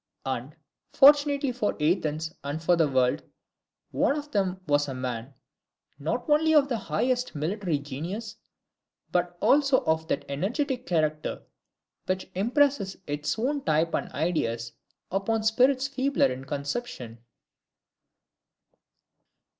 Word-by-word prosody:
And, -, -, -4 dB, 0.4 s
fortunately 285 Hz, -1 st, +5 dB
for 240 Hz, -4 st, -1 dB
Athens 155 Hz, 0 st, 0 dB
and 145 Hz, +2 st, -3 dB
for 170 Hz, +2 st, +3 dB
the 165 Hz, -2 st, +3 dB
world, 130 Hz, -2 st, +2 dB, 0.7 s
one 285 Hz, -, +1 dB
of 295 Hz, 0 st, -7 dB
them 190 Hz, -3 st, 0 dB
was 145 Hz, -1 st, +2 dB
a 135 Hz, -, -4 dB
man, 125 Hz, 0 st, -5 dB, 0.6 s
not 165 Hz, -, -2 dB
only 315 Hz, +1 st, +4 dB
of 285 Hz, -2 st, +5 dB
the 240 Hz, -, 0 dB
highest 245 Hz, +10 st, -1 dB
military 170 Hz, +2 st, -1 dB
genius, 165 Hz, -, -6 dB, 0.8 s
but 175 Hz, 0 st, 0 dB
also 275 Hz, -2 st, +4 dB
of 160 Hz, 0 st, +1 dB
that 140 Hz, -, -2 dB
energetic 245 Hz, -, -2 dB
character 155 Hz, -3 st, -1 dB, 0.6 s
which 185 Hz, 0 st, -2 dB
impresses 230 Hz, -1 st, +1 dB
its 150 Hz, 0 st, -2 dB
own 275 Hz, +5 st, -1 dB
type 160 Hz, +1 st, +1 dB
and -, -, -2 dB
ideas 115 Hz, -9 st, -1 dB, 0.4 s
upon 215 Hz, +4 st, 0 dB
spirits 255 Hz, +4 st, +3 dB
feebler 275 Hz, -, +1 dB
in 130 Hz, +1 st, -6 dB
conception. 140 Hz, -, -5 dB
185 Hz, 120 wpm, -27 LUFS, -, 0.8 s, fortunately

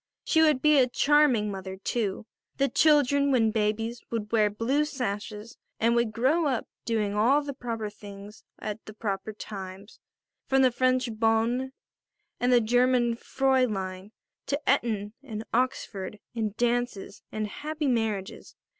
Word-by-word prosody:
She 320 Hz, -, +3 dB
would 305 Hz, -5 st, +3 dB
be 300 Hz, -2 st, +6 dB
a 255 Hz, -1 st, +4 dB
charming 270 Hz, -7 st, +3 dB
mother, 190 Hz, -1 st, -6 dB
too; 205 Hz, 0 st, -2 dB, 0.3 s
the 275 Hz, -, +3 dB
children, 285 Hz, -2 st, +4 dB
when 230 Hz, -5 st, +3 dB
babies, 225 Hz, +2 st, -1 dB
would 215 Hz, -3 st, -4 dB
wear 215 Hz, -2 st, +3 dB
blue 230 Hz, +8 st, 0 dB
sashes 215 Hz, -5 st, -5 dB, 0.2 s
and 230 Hz, +1 st, +3 dB
would 235 Hz, -2 st, +1 dB
grow 275 Hz, +8 st, +2 dB
up 260 Hz, -4 st, -1 dB, 0.2 s
doing 215 Hz, -3 st, 0 dB
all 250 Hz, +8 st, +3 dB
the 285 Hz, -1 st, -5 dB
proper 230 Hz, -4 st, -4 dB
things 205 Hz, 0 st, -11 dB
at 215 Hz, +1 st, -6 dB
the 215 Hz, -, -10 dB
proper 200 Hz, -1 st, -3 dB
times, 195 Hz, -1 st, -9 dB, 0.5 s
from 270 Hz, 0 st, +4 dB
the 255 Hz, -, +5 dB
French 255 Hz, +1 st, +1 dB
bonne 230 Hz, +4 st, +1 dB, 0.7 s
and 245 Hz, +1 st, +2 dB
the 245 Hz, -1 st, +6 dB
German 245 Hz, +1 st, +3 dB
Fräulein 215 Hz, -8 st, 0 dB, 0.4 s
to 280 Hz, -, 0 dB
Eton 220 Hz, -6 st, +1 dB
and 220 Hz, -6 st, -6 dB
Oxford 225 Hz, -5 st, -1 dB, 0.2 s
and 220 Hz, -3 st, -3 dB
dances 240 Hz, -4 st, -1 dB
and 215 Hz, 0 st, -2 dB
happy 300 Hz, +7 st, -4 dB
marriages. 220 Hz, -6 st, -2 dB
230 Hz, 145 wpm, -27 LUFS, 210-260 Hz, 0.7 s, be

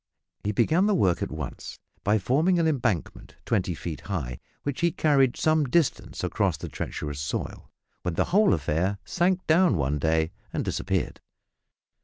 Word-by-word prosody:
He 105 Hz, -, 0 dB
began 160 Hz, -, +3 dB
the 210 Hz, -, +3 dB
work 95 Hz, -, +2 dB
at -, -, -1 dB
once 75 Hz, -4 st, -6 dB, 0.3 s
by 105 Hz, +2 st, +3 dB
forming 150 Hz, -, +2 dB
an 165 Hz, -1 st, +3 dB
embankment 120 Hz, -, -1 dB
twenty 95 Hz, -5 st, 0 dB
feet 80 Hz, 0 st, -6 dB
high, 65 Hz, -11 st, -3 dB, 0.2 s
which 145 Hz, +1 st, -3 dB
he 170 Hz, -, +4 dB
carried 135 Hz, -5 st, +3 dB
some 155 Hz, -1 st, +3 dB
distance 155 Hz, +3 st, 0 dB
across -, -, 0 dB
the -, -, -7 dB
treacherous 75 Hz, -2 st, -5 dB
soil, 75 Hz, -, -4 dB, 0.3 s
when 90 Hz, -2 st, -2 dB
the -, -, +2 dB
whole 210 Hz, -, +5 dB
affair 85 Hz, +6 st, -1 dB
sank 180 Hz, +1 st, +1 dB
down 160 Hz, -, +4 dB
one 70 Hz, 0 st, 0 dB
day 80 Hz, +2 st, +1 dB, 0.2 s
and -, -, -2 dB
disappeared! -, -, -2 dB
110 Hz, 160 wpm, -26 LUFS, -, 0.3 s, whole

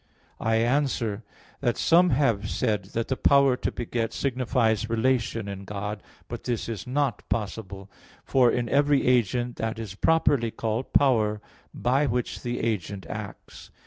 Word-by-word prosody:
I 110 Hz, 0 st, +1 dB
answer 120 Hz, -3 st, 0 dB, 0.4 s
that, 120 Hz, -4 st, 0 dB
Some 175 Hz, +2 st, +4 dB
have 120 Hz, -8 st, +1 dB
said 105 Hz, -3 st, -1 dB
that 115 Hz, 0 st, -1 dB
the 130 Hz, -, 0 dB
power 140 Hz, -1 st, +4 dB
to -, -, -2 dB
beget 115 Hz, -1 st, -3 dB
signifies 120 Hz, -4 st, 0 dB
relation 115 Hz, -2 st, 0 dB
in 100 Hz, -1 st, -6 dB
God. 105 Hz, +2 st, -5 dB, 0.3 s
But -, -, -7 dB
this 120 Hz, -3 st, -2 dB
is 115 Hz, -3 st, -5 dB
not 135 Hz, 0 st, 0 dB
possible. 100 Hz, -2 st, -4 dB, 0.4 s
For 130 Hz, -3 st, +4 dB
in 120 Hz, -1 st, -1 dB
every 145 Hz, +3 st, +3 dB
agent, 120 Hz, 0 st, +1 dB
that 115 Hz, +1 st, -3 dB
is 110 Hz, -4 st, -6 dB
properly 140 Hz, -1 st, +2 dB
called 110 Hz, +3 st, -3 dB
power, 110 Hz, -6 st, +3 dB, 0.3 s
by 135 Hz, +4 st, +1 dB
which 125 Hz, -1 st, -2 dB
the 120 Hz, 0 st, -3 dB
agent 100 Hz, -3 st, -2 dB
acts. 110 Hz, -2 st, -8 dB
115 Hz, 145 wpm, -26 LUFS, 110-130 Hz, 0.4 s, Some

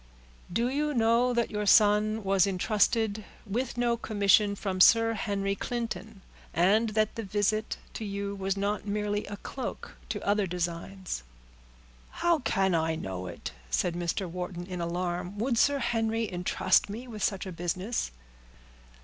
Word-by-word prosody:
"Do 230 Hz, +6 st, +1 dB
you 295 Hz, +2 st, -1 dB
know 235 Hz, +2 st, +3 dB
that 235 Hz, -1 st, 0 dB
your 210 Hz, -1 st, -2 dB
son 210 Hz, +1 st, +5 dB
was 195 Hz, -1 st, +3 dB
intrusted 210 Hz, +2 st, +1 dB, 0.2 s
with 235 Hz, +5 st, -2 dB
no 240 Hz, -1 st, +2 dB
commission 205 Hz, -1 st, +3 dB
from 190 Hz, -2 st, -2 dB
Sir 225 Hz, +3 st, +6 dB
Henry 200 Hz, -2 st, -1 dB
Clinton, 225 Hz, -2 st, -4 dB, 0.3 s
and 205 Hz, +7 st, +4 dB
that 215 Hz, -1 st, +2 dB
the 230 Hz, -, -4 dB
visit 210 Hz, +1 st, 0 dB, 0.2 s
to -, -, -5 dB
you 200 Hz, -1 st, -3 dB
was 195 Hz, 0 st, -2 dB
not 205 Hz, +1 st, -1 dB
merely 210 Hz, 0 st, -1 dB
a 205 Hz, -, -6 dB
cloak 260 Hz, +5 st, -6 dB, 0.2 s
to -, -, -2 dB
other 205 Hz, -1 st, +2 dB
designs?" 175 Hz, -, -4 dB, 0.9 s
"How 340 Hz, -2 st, +1 dB
can 195 Hz, -7 st, +1 dB
I 160 Hz, -1 st, +1 dB
know 95 Hz, -, -5 dB
it?" -, -, -6 dB, 0.2 s
said 170 Hz, -, +1 dB
Mr. 175 Hz, +2 st, -2 dB
Wharton, 175 Hz, 0 st, -5 dB
in 180 Hz, -1 st, -5 dB
alarm. 175 Hz, +2 st, -3 dB
"Would 235 Hz, +2 st, +1 dB
Sir 285 Hz, 0 st, +4 dB
Henry 225 Hz, -2 st, 0 dB
intrust 185 Hz, +1 st, +2 dB
me 230 Hz, +5 st, -6 dB
with 215 Hz, -3 st, -8 dB
such 195 Hz, -2 st, 0 dB
a 190 Hz, -, -5 dB
business?" 180 Hz, +6 st, -2 dB
205 Hz, 150 wpm, -29 LUFS, 185-225 Hz, 0.9 s, Sir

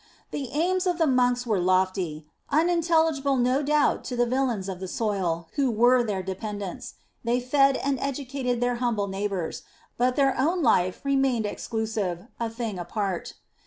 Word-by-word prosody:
The 270 Hz, -4 st, -4 dB
aims 365 Hz, +5 st, +1 dB
of 355 Hz, -2 st, +1 dB
the 330 Hz, -, +3 dB
monks 250 Hz, -2 st, +2 dB
were 215 Hz, -5 st, +1 dB
lofty, 185 Hz, -4 st, 0 dB, 0.2 s
unintelligible 320 Hz, -4 st, +2 dB
no 255 Hz, +3 st, +2 dB
doubt 295 Hz, 0 st, +2 dB
to 250 Hz, -, -4 dB
the 240 Hz, 0 st, +2 dB
villeins 240 Hz, -6 st, 0 dB
of 190 Hz, -2 st, -5 dB
the 190 Hz, -, -5 dB
soil, 180 Hz, -6 st, -1 dB
who 275 Hz, -2 st, +3 dB
were 245 Hz, +3 st, +4 dB
their 205 Hz, -5 st, -2 dB
dependents; 205 Hz, +4 st, -5 dB, 0.3 s
they 240 Hz, +1 st, +1 dB
fed 275 Hz, +2 st, +3 dB
and 275 Hz, -2 st, -1 dB
educated 265 Hz, -2 st, -2 dB
their 245 Hz, 0 st, +1 dB
humble 235 Hz, -4 st, 0 dB
neighbours, 195 Hz, -3 st, -3 dB, 0.4 s
but 250 Hz, +1 st, +2 dB
their 275 Hz, -2 st, +3 dB
own 330 Hz, +5 st, +1 dB
life 185 Hz, -7 st, +2 dB
remained 270 Hz, -5 st, +1 dB
exclusive, 210 Hz, -4 st, -3 dB
a 230 Hz, -1 st, -1 dB
thing 225 Hz, -4 st, -4 dB
apart. 190 Hz, 0 st, -3 dB
245 Hz, 160 wpm, -26 LUFS, 200-275 Hz, 0.4 s, were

